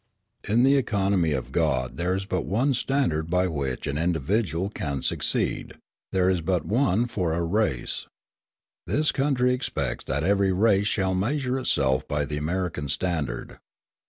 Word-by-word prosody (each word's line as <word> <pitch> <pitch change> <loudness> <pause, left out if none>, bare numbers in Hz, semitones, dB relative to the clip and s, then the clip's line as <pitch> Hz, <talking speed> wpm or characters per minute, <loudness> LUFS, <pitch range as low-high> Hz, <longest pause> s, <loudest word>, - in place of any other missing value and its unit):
In 115 +4 +3
the 135 +2 +5
economy 100 - +1
of 65 -3 -3
God 65 -6 0
there 90 +2 0
is 95 0 -3
but 95 -2 -1
one 130 +8 +2
standard 120 - 0
by 90 +1 +2
which 70 -7 -3
an 70 +1 -2
individual 90 - 0
can 70 -8 -3
succeed: - - 0 0.4
there 95 -1 +2
is 95 -2 +2
but 90 0 0
one 115 -1 +2
for 90 -9 -1
a 85 +1 0
race. 85 - -1 0.8
This 155 +1 +2
country 130 -2 +2
expects 70 - -3
that 70 +2 -1
every 100 +1 +3
race 100 +1 +3
shall 95 -3 +1
measure 130 +7 0
itself 65 - +1
by 75 0 0
the 75 +1 -4
American 80 -1 -2
standard. 80 +1 -2
95 Hz, 155 wpm, -25 LUFS, 80-110 Hz, 0.8 s, the